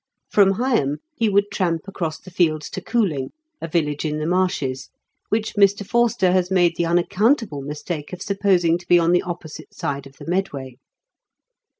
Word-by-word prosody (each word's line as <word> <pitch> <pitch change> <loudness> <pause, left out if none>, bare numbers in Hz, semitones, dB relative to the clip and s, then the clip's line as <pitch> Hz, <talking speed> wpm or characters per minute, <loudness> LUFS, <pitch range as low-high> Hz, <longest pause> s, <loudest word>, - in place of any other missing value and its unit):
From 195 -2 +5
Higham 225 - +1 0.2
he 230 -7 +1
would 200 0 +2
tramp 170 -2 -1
across 165 -5 -3
the 185 - -14
fields 155 -4 0
to 190 - -5
Cooling, 180 - 0 0.3
a - - -3
village 150 -3 -1
in 150 -1 -1
the 155 - -3
marshes, 170 -7 -1 0.4
which 220 +1 -1
Mr. 200 -1 +3
Forster 230 -5 +2
has 180 -1 +2
made 175 -3 +3
the 170 - 0
unaccountable 180 - +1
mistake 150 +2 -5
of 180 - -6
supposing 185 -4 +2
to 180 - -17
be 175 - +6
on 170 0 +3
the 180 - +4
opposite 170 -3 -8
side 140 -1 -3
of 135 - -17
the - - -11
Medway. 145 -8 -3
175 Hz, 175 wpm, -22 LUFS, 155-195 Hz, 0.4 s, be